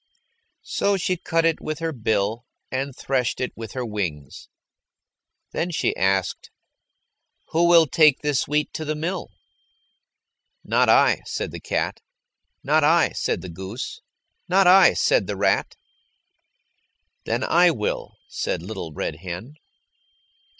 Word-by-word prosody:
So 200 0 0
she 185 0 0
cut 165 -1 0
it 165 -1 +1
with 155 -1 -4
her 165 0 -2
bill 110 -2 -1 0.2
and 135 0 -3
threshed 130 -4 -1
it 125 - -3
with 115 -1 -8
her 130 -2 -3
wings. 85 - -5 1.0
Then 175 - -2
she 170 - -1
asked, 95 -1 0 1.0
"Who 170 +2 +2
will 170 -1 +7
take 150 -1 +4
this 145 -3 0
wheat 150 +1 -1
to 160 - -4
the 155 0 -2
mill?" 170 +4 -4 1.3
"Not - - +2
I," - - +4
said - - -4
the - - -7
cat. - - -2 0.6
"Not 155 +2 +3
I," 165 +3 +4
said - - -2
the 90 - -8
goose. 95 +7 -7 0.5
"Not 190 +2 +4
I," 185 +2 +7
said - - +2
the - - -4
rat. - - +1 1.5
"Then - - -1
I 175 +1 +4
will," 110 -11 -3
said - - -3
Little 95 -4 -6
Red 75 - -4
Hen. 90 - -7
140 Hz, 135 wpm, -23 LUFS, 105-165 Hz, 1.5 s, will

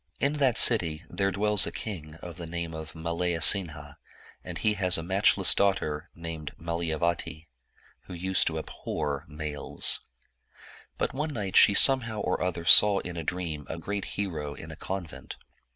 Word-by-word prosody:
In 140 +1 +1
that 130 -5 +2
dty 85 -10 +3
there 100 0 -1
dwells 105 +1 +2
a - - -4
king 80 -8 -8
of 90 0 -9
the 85 -2 -7
name 85 0 -5
of 80 0 -9
Malayasinha, 85 -2 +2 0.5
and - - -7
he 110 - +1
has 95 -3 +3
a 80 - -5
matchless 95 +1 +2
daughter, 90 -5 -1
named 80 -3 -7
Malayavati, 85 -1 -3 0.6
who - - -10
used 95 +2 0
to 80 - -2
abhor 75 -2 -5
males. 75 -1 -2 1.0
But - - -2
one 150 +4 -3
night 100 -8 -5
she 100 - +6
somehow 115 -5 +4
or - - -2
other 85 -2 -3
saw 100 +6 +9
in 90 - -7
a 85 - -4
dream 80 -4 -5
a 80 - -5
great 100 +4 -5
hero 80 -8 -4
in 80 - -10
a - - -9
convent. 90 -1 -7
85 Hz, 160 wpm, -27 LUFS, 80-100 Hz, 1.0 s, saw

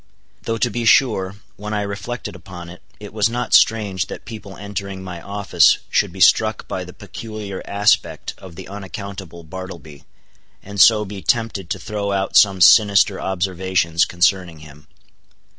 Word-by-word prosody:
Though 115 0 -3
to 120 +1 0
be 120 +2 -3
sure, 105 -5 +3 0.2
when 105 +1 -5
I 105 - -1
reflected 100 +5 -6
upon 90 -4 -10
it, 90 - -13 0.2
it 105 -1 -10
was 110 0 +2
not 120 +1 -3
strange 105 -5 +3
that - - -9
people 105 -4 -9
entering 100 -1 -6
my 90 -2 -8
office 100 -5 +3
should - - +1
be - - -11
struck - - +3
by - - -4
the - - -10
peculiar 105 -4 -8
aspect 100 +1 +1
of 95 -3 -12
the 95 +1 -9
unaccountable 95 -3 -8
Bartleby, 85 -3 -10 0.6
and 100 -1 -2
so 105 +2 +6
be 100 0 -8
tempted 100 -1 -1
to - - -2
throw 100 -1 -4
out 95 0 -2
some 95 -3 +5
sinister 100 +1 +5
observations 90 -2 0
concerning 90 -2 0
him. 75 -1 -15
100 Hz, 160 wpm, -20 LUFS, 90-105 Hz, 0.6 s, so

